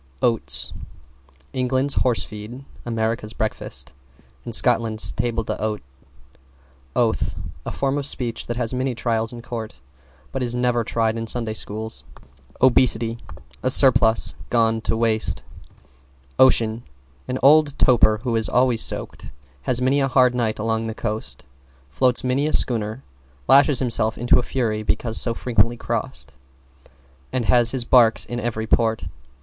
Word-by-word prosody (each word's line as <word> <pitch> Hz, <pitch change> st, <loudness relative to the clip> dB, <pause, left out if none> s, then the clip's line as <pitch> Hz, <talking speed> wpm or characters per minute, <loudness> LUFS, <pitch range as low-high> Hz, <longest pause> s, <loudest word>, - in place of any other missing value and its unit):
=OATS= 70 Hz, -, +1 dB, 0.8 s
England's 130 Hz, +2 st, +1 dB
horse 125 Hz, -3 st, +1 dB
feed, 110 Hz, +6 st, -9 dB, 0.2 s
America's 110 Hz, -1 st, -2 dB
breakfast 70 Hz, -, -5 dB, 0.5 s
and 120 Hz, -2 st, -2 dB
Scotland's 115 Hz, -3 st, +2 dB
table 115 Hz, -1 st, -2 dB
d'hote. 105 Hz, -2 st, -4 dB, 1.1 s
=OATH= -, -, 0 dB, 0.3 s
A -, -, -3 dB
form 140 Hz, +1 st, -1 dB
of 140 Hz, -, -1 dB
speech 120 Hz, -5 st, -1 dB
that 120 Hz, -, -4 dB
has 120 Hz, -1 st, -2 dB
many 130 Hz, 0 st, -2 dB
trials 115 Hz, -1 st, -1 dB
in 120 Hz, -1 st, -10 dB
court, 115 Hz, -3 st, -7 dB, 0.5 s
but 130 Hz, -, -4 dB
is 120 Hz, -1 st, 0 dB
never 125 Hz, -1 st, 0 dB
tried 115 Hz, 0 st, -1 dB
in 115 Hz, -, -5 dB
Sunday 115 Hz, -1 st, -1 dB
School. 110 Hz, +1 st, -4 dB, 0.7 s
=OBESITY= 120 Hz, -3 st, +3 dB, 0.4 s
A 130 Hz, -, 0 dB
surplus 125 Hz, -4 st, +5 dB, 0.2 s
gone 115 Hz, -1 st, +1 dB
to 110 Hz, -, -1 dB
waist. 110 Hz, -1 st, 0 dB, 1.0 s
=OCEAN= 115 Hz, -3 st, +4 dB, 0.5 s
An 125 Hz, -, -2 dB
old 145 Hz, 0 st, +5 dB
toper 110 Hz, -4 st, +3 dB
who 120 Hz, -3 st, -1 dB
is 110 Hz, -1 st, 0 dB
always 125 Hz, -2 st, +2 dB
soaked, -, -, -5 dB, 0.3 s
has 125 Hz, -, -1 dB
many 135 Hz, +2 st, +2 dB
a 135 Hz, -, +1 dB
hard 130 Hz, -2 st, +3 dB
night 115 Hz, -3 st, -1 dB
along 110 Hz, +1 st, -2 dB
the 110 Hz, -, -5 dB
coast, 105 Hz, -, -5 dB, 0.4 s
floats 125 Hz, -, +1 dB
many 130 Hz, +3 st, 0 dB
a 155 Hz, -, -3 dB
schooner, 110 Hz, 0 st, +1 dB, 0.4 s
lashes 140 Hz, 0 st, +5 dB
himself 115 Hz, -3 st, +2 dB
into 120 Hz, +1 st, +3 dB
a -, -, 0 dB
fury 115 Hz, -4 st, -2 dB
because 110 Hz, +1 st, -1 dB
so 115 Hz, -1 st, 0 dB
frequently 115 Hz, 0 st, 0 dB
crossed, 65 Hz, -, -5 dB, 0.9 s
and 125 Hz, -3 st, -2 dB
has 120 Hz, 0 st, +3 dB
his 125 Hz, -1 st, -2 dB
barks 115 Hz, -2 st, +4 dB
in 120 Hz, -, -5 dB
every 110 Hz, -2 st, -3 dB
port. 110 Hz, 0 st, +1 dB
115 Hz, 145 wpm, -22 LUFS, 110-125 Hz, 1.1 s, surplus